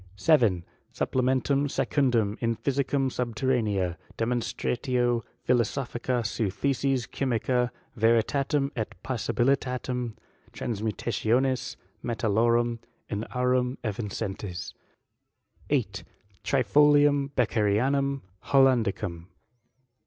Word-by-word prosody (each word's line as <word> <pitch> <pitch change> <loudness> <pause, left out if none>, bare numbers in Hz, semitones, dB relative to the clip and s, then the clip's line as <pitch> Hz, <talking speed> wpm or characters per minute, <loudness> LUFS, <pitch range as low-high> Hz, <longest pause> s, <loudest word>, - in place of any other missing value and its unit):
7. 100 - +3 0.3
Supplementum 130 +2 +1
secundum 120 -8 +1
in 115 -1 +1
Physicam 135 +1 0
subter 125 +1 -2
raneam, 100 -8 +1 0.2
demonstratio 120 +1 0 0.3
philosophica 125 0 0
seu 110 -1 -1
Theses 135 +4 0
Chy 140 - -4
micee, 125 0 +1 0.3
veiitatem 135 +5 +2
et 110 -3 -4
possibilitatem 125 -1 -1 0.4
transmutationis 120 +4 -1 0.3
me* 120 - -2
taUorum 115 +2 +2 0.3
in 105 +1 -3
aurum 125 0 0
erincentes. 105 -3 -4 1.0
8. - - 0 0.4
Trifolium 145 +3 +4
Beccherianum 125 +5 +1 0.2
Hollandicum. 110 -10 +2
125 Hz, 80 wpm, -27 LUFS, 110-135 Hz, 1.0 s, Trifolium